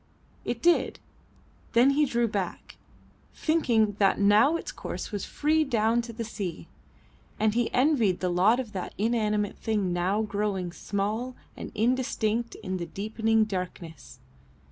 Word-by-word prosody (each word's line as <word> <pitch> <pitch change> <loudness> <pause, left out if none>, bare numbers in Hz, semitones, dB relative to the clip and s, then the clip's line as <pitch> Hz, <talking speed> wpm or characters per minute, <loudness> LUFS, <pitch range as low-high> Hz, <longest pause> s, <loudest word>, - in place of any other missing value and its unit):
It - - -4
did; 345 0 +3 0.8
then 245 +4 +6
he 295 +2 +3
drew 235 -1 +1
back, 200 -5 -4 0.6
thinking 235 -10 +2
that 195 -2 +3
now 210 +10 +5
its - - -4
course - - -6
was 205 -2 -3
free 310 +1 +1
down 235 -3 +2
to 235 0 -8
the 230 +1 -5
sea, 195 -6 -5 0.7
and 215 -1 +2
he 240 0 0
envied 250 - +2
the 180 - 0
lot 200 +8 +4
of 240 -5 -4
that 190 -3 -5
inanimate 210 -2 0
thing 205 -5 0
now 185 +5 +1
growing 200 -4 -2
small 215 +7 -3 0.2
and - - -7
indistinct 235 -1 0
in 185 0 -2
the 170 -1 -5
deepening 220 +4 +1
darkness. 180 -5 -6
215 Hz, 145 wpm, -27 LUFS, 200-240 Hz, 0.8 s, then